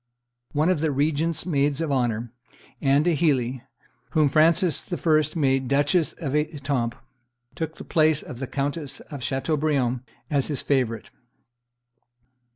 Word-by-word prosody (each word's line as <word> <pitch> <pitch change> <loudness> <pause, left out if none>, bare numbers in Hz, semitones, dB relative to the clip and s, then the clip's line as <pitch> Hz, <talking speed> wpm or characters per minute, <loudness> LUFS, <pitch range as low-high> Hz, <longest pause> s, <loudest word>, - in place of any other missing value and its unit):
One 155 +3 +2
of 185 - +2
the 160 +1 +1
regent's 150 +3 0
maids 145 -4 +1
of 165 -3 -1
honor, 120 -3 -1 0.5
Anne 140 +1 +3
d'Heilly, 140 -7 +1 0.5
whom 155 -3 +4
Frances 160 +3 +3
I. 155 -3 +3 0.2
made 135 -2 +2
Duchess 145 +3 +2
of 140 -5 -5
Etampes, 140 -6 -1 0.6
took 160 0 -4
the - - -9
place 155 -2 +2
of 120 - -9
the 130 - -4
Countess 145 +2 -3
of 145 -3 -6
Chateaubriant 135 -3 0 0.3
as 140 -4 0
his 145 -4 -3
favorite. 125 -6 -1
145 Hz, 130 wpm, -24 LUFS, 135-155 Hz, 0.6 s, whom